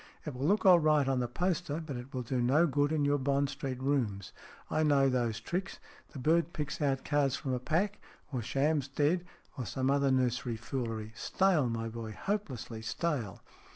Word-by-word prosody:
It 150 - -4
will 130 +3 -2
look 205 +3 +2
all 180 -2 +8
right 155 -3 +3
on 135 -1 +1
the 125 - 0
poster, 175 +2 -1
but 155 -4 -6
it 125 +2 -7
will 130 -1 -3
do 125 +1 -1
no 140 +8 +4
good 145 -1 +1
in 150 -2 +1
your 145 0 +2
Bond 140 +1 +1
Street 135 -3 -4
rooms. 115 -9 -1 0.3
I 155 - 0
know 140 -3 +4
those 120 -3 0
tricks. 180 - -3 0.4
The - - -8
bird 160 +4 +2
picks 150 +1 -4
out 135 -2 0
cards 145 -3 +2
from 135 -4 -3
a 125 - 0
pack, 175 +10 0 0.3
or 125 - -1
shams 140 +4 +1
dead, 155 +6 +1 0.3
or 125 - -3
some 130 +8 0
other 140 0 +3
nursery 125 -2 +1
foolery. 115 -3 -4
Stale, 175 - +2
my 115 0 -2
boy, 115 -1 -6
hopelessly 135 - -3
stale." 115 - -2
140 Hz, 190 wpm, -31 LUFS, 125-155 Hz, 0.4 s, all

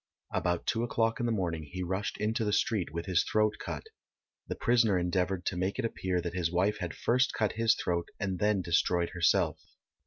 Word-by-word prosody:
About 85 -1 0
two 115 - 0
o'clock 115 +1 0
in 120 - 0
the - - +1
morning 85 -7 -1
he 90 +5 -6
rushed 95 +4 -2
into 110 +3 0
the 105 - 0
street 105 -6 +1
with 85 +1 -4
his 90 -3 +2
throat 110 0 +1
cut. - - -5 0.6
The - - -3
prisoner 115 -5 +3
endeavoured 90 +1 0
to - - -1
make 95 +2 -1
it 130 - -1
appear 95 -5 -1
that 85 0 -4
his 85 -2 -1
wife 95 +4 +1
had 90 -3 -4
first 125 +2 +2
cut 110 -2 +1
his 115 0 +3
throat 85 -1 -1
and 95 -3 -2
then 105 -2 +2
destroyed 85 0 +2
herself. 90 -2 +2
95 Hz, 205 wpm, -30 LUFS, 90-110 Hz, 0.6 s, prisoner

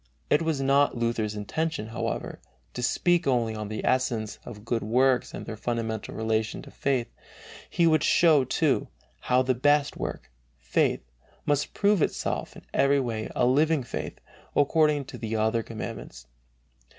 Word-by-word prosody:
It 150 - +4
was 160 -3 0
not 140 -1 +3
Luther's 115 -3 -1
intention, 110 +3 -3
however, 110 - -4 0.3
to 125 - -4
speak 175 +7 +2
only 120 -4 +1
on 105 -1 -5
the 110 +1 -4
essence 120 -5 0
of 105 -3 -10
good 120 -1 -1
works 125 +4 +2
and - - -7
their 110 - -5
fundamental 115 -1 -3
relation 110 0 -1
to - - -12
faith; 130 -4 0 0.6
he 170 - +2
would 155 -2 +4
show, 155 -5 +5
too, - - +1 0.3
how 125 +1 +2
the 130 0 +2
"best 145 +3 +2
work," 65 - -5 0.3
faith, 65 +1 +1 0.4
must 145 -1 0
prove 205 -3 +3
itself - - -2
in - - -13
every 140 0 +3
way 115 -4 -3
a 125 - +3
living 150 +3 +3
faith, 120 - -5 0.4
according 150 -1 +3
to - - -9
the 110 -1 -3
other 110 +1 +1
commandments. 110 - -7
125 Hz, 155 wpm, -27 LUFS, 110-145 Hz, 0.6 s, show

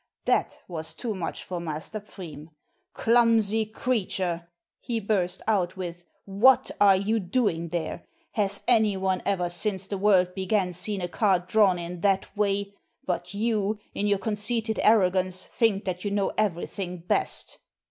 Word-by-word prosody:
That - - +1
was 160 -3 -5
too 235 -3 -3
much 180 -4 -4
for 180 -1 -4
Master 160 +5 -4
Pfriem, 165 -7 -10 0.5
"Clumsy 225 -2 +3
creature," 185 -7 -1 0.3
he 235 -3 -2
burst 190 -4 -1
out 190 -4 +1
with, 175 -1 -6 0.2
"what 215 +7 +4
are 200 -1 +7
you 210 +4 +1
doing 180 -4 0
there? 170 -1 -4 0.2
Has 205 -3 -1
any 220 -5 +4
one 190 -1 0
ever 180 -3 +1
since 190 +2 -3
the 195 0 -4
world 185 -3 +4
began 190 -1 0
seen 190 +3 -4
a 175 - -1
cart 180 0 +1
drawn 210 -5 +4
in 175 0 -6
that 195 0 +1
way? 200 -1 0 0.3
But 180 +1 -3
you, 215 -1 0 0.2
in 205 - -1
your 205 -1 +3
conceited 220 +2 -2
arrogance, 185 -3 +3
think 215 -3 +1
that 180 -1 -3
you 205 - -1
know 200 -1 0
everything 180 -2 -2
best." 175 - -1
195 Hz, 150 wpm, -26 LUFS, 180-215 Hz, 0.5 s, are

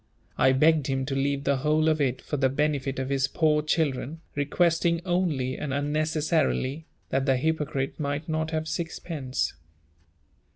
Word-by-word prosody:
I 130 - +4
begged 150 +2 +3
him 135 -1 -1
to 135 0 -3
leave 140 0 0
the 140 -1 +2
whole 155 +3 +2
of 155 -1 +2
it 130 -2 0
for - - -3
the 135 -2 +2
benefit 140 -1 -1
of 130 0 -2
his 135 -1 +1
poor 150 +1 +2
children, 150 -1 -1
requesting 170 +3 +2
only, 165 -8 0
and 150 - -3
unnecessarily, 155 0 0 0.2
that 135 +1 0
the 135 -1 +4
hypocrite 150 -1 -1
might 145 +1 -2
not 160 0 -1
have 160 0 -2
sixpence. 160 -5 -3
145 Hz, 155 wpm, -27 LUFS, 135-160 Hz, 0.2 s, I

